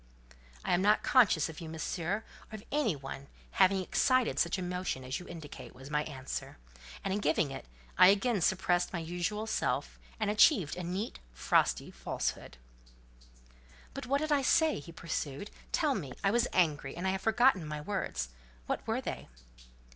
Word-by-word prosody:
"I - - +1
am 175 - +3
not 210 +2 +4
conscious 205 - +4
of 160 +1 -9
you, 165 - -6
monsieur, 170 +5 -2 0.3
or - - -6
of 215 - -9
any 280 - +1
other 135 0 -8 0.2
having 190 0 +4
excited 255 +5 +2
such - - +2
emotion 180 -6 -3
as 130 +1 -3
you 180 - -11
indicate," 160 -7 -9
was 135 +3 -11
my 150 0 +2
answer; 135 - -6 0.5
and 190 - -1
in 205 - 0
giving 155 -5 +1
it, 135 - -7 0.3
I - - +10
again 205 +2 +3
surpassed 175 0 +2
my - - -1
usual 175 +6 -2
self, 220 - -1 0.2
and 215 -2 +1
achieved 210 - +4
a 180 - -5
neat, 185 +6 -4 0.2
frosty - - +2
falsehood. - - -4 1.4
"But 275 -2 -6
what 280 +3 +1
did 310 0 -1
I 290 -1 +4
say?" 320 - +3
he 155 +4 -10
pursued; 150 - -4 0.2
"tell - - +2
me: 130 -3 -4
I 195 - +3
was 240 +2 +2
angry: 150 -5 +1
I 185 +2 -2
have 190 0 -1
forgotten 225 -4 +4
my 150 0 -5
words; 150 - -3 0.4
what - - -2
were - - 0
they?" - - -5
180 Hz, 170 wpm, -31 LUFS, 150-215 Hz, 1.4 s, I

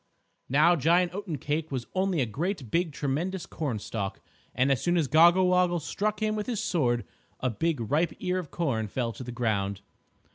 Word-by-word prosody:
Now 155 +6 +5
Giant 170 +4 +3
Oatencake 160 -5 -3
was 130 -3 -3
only 185 -4 +1
a - - +2
great 145 - -3
big 170 -1 +1
tremendous 155 +7 -2
cornstalk, 110 -8 -4 0.4
and 130 +2 +3
as 135 - +1
soon 175 0 +2
as 160 -4 +2
Goggle 170 +6 +6
Woggle 180 -1 +3
struck 210 +7 -2
him 215 0 +1
with 210 -1 -3
his 235 -5 -1
sword, 125 - 0 0.3
a 130 - 0
big 160 +5 -1
ripe 150 +9 0
ear 185 -1 -1
of 170 -5 -7
corn 125 -10 -1
fell 115 +3 -2
to 130 - -8
the 125 - -6
ground. 100 -5 -1
155 Hz, 180 wpm, -28 LUFS, 125-180 Hz, 0.4 s, Goggle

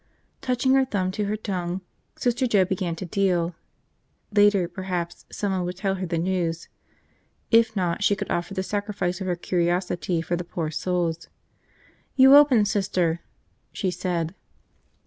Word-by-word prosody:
Touching 255 +1 +1
her 270 0 +5
thumb 190 -7 -1
to 210 +2 -2
her 210 +2 -1
tongue, 185 -3 -3 0.3
Sister 245 +1 0
Joe 200 -5 +4
began 180 -2 -2
to 185 - -6
deal. 180 -2 +1 0.8
Later, 205 -3 +4
perhaps, 175 -1 -4
someone 190 -3 -1
would 180 0 -4
tell 195 0 0
her 185 - -2
the 165 - -1
news. 170 -1 -1 0.8
If 225 -1 +4
not, 180 -1 -1
she 205 0 +3
could - - -5
offer 175 +3 -2
the 190 - -1
sacrifice 205 -2 -2
of 190 - -3
her 180 - 0
curiosity 175 0 0
for 175 +1 -1
the 175 - -3
poor 165 -2 -4
souls. 170 -1 -1 0.9
"You 265 +1 +8
open, 275 -7 +6
Sister," 185 -5 0 0.5
she 190 -3 -2
said. 175 -2 -2
185 Hz, 150 wpm, -25 LUFS, 175-205 Hz, 0.9 s, You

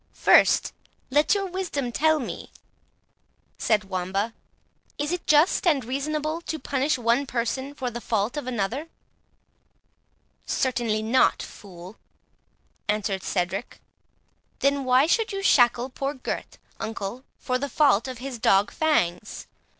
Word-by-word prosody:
"First - - +4 0.4
let 295 +8 +4
your 395 -1 -1
wisdom 350 -9 -3
tell 315 +5 +3
me," 270 - -6 1.1
said 215 -2 +2
Wamba, 195 +3 -2 0.6
"is 295 +2 -2
it 355 -1 -4
just 305 +5 +4
and 280 -8 +3
reasonable 305 +5 -2
to 320 - -4
punish 275 +1 0
one 240 +3 +1
person 260 +4 -2
for 255 -4 -3
the 240 +1 -6
fault 220 +2 -1
of 295 -4 -4
another?" 245 +6 -2 1.6
"Certainly 235 -4 0
not, 235 +4 +3
fool," 185 0 -11 0.9
answered 205 -2 -1
Cedric. 190 +4 -3 0.8
"Then 280 -1 +1
why 255 +2 +5
should 440 +7 +1
you 390 0 -4
shackle 245 -4 +4
poor 275 +3 -3
Gurth, 260 - -5 0.2
uncle, 220 +3 -5
for 255 -1 -2
the 280 +1 -3
fault 270 -5 +3
of 255 -1 -6
his 250 -1 -6
dog 195 -1 +3
Fangs? 210 - 0
255 Hz, 125 wpm, -25 LUFS, 220-295 Hz, 1.6 s, why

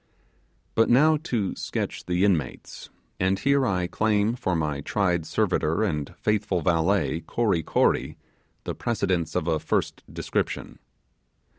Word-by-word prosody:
But 115 - +3
now 155 +6 +5
to 105 -9 -1
sketch - - -4
the 90 +2 +2
inmates; 80 -10 -2 0.3
and 95 +1 +2
here 140 +1 +2
I 90 -3 0
claim 105 +3 +1
for 95 -8 -1
my 75 -3 -1
tried 90 -1 0
servitor 80 +7 +1
and 75 -8 -2
faithful 105 -4 0
valet 80 -1 +1
Kory 105 -8 +1
Kory - - +1 0.5
the - - -3
precedence 90 -7 -1
of 90 -2 0
a 80 -2 +1
first - - -1
description. - - -3
95 Hz, 130 wpm, -25 LUFS, 80-110 Hz, 0.5 s, now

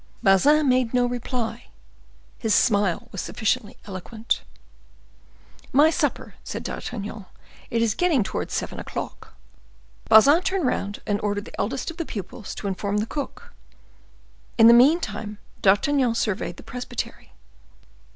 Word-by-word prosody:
Bazin 280 +10 +5
made 255 -2 +2
no 245 0 +4
reply; 245 -1 -3 0.7
his 220 -2 +2
smile 200 -5 +2
was 195 - -4
sufficiently 215 -2 -2
eloquent. 215 +4 -3 1.3
"My 300 +4 +5
supper," - - -1
said - - -5
D'Artagnan, 210 -3 -6 0.4
"it 230 0 +1
is 225 -3 +2
getting 325 - +2
towards 215 - -4
seven - - -3
o'clock." - - -7 0.7
Bazin 275 +10 +7
turned 380 -3 -1
round 205 -4 -2
and 205 -1 -1
ordered 205 0 -2
the - - -11
eldest 265 +8 -2
of 330 - -15
the 335 - -3
pupils 205 0 -7
to 205 - -5
inform 200 +2 -2
the 210 - 0
cook. 280 +4 -6 1.0
In 225 - +7
the 235 - +10
meantime, 235 - +3 0.2
D'Artagnan 235 +5 +3
surveyed 200 -5 -2
the - - -12
presbytery. 250 0 -6
225 Hz, 130 wpm, -24 LUFS, 205-260 Hz, 1.3 s, the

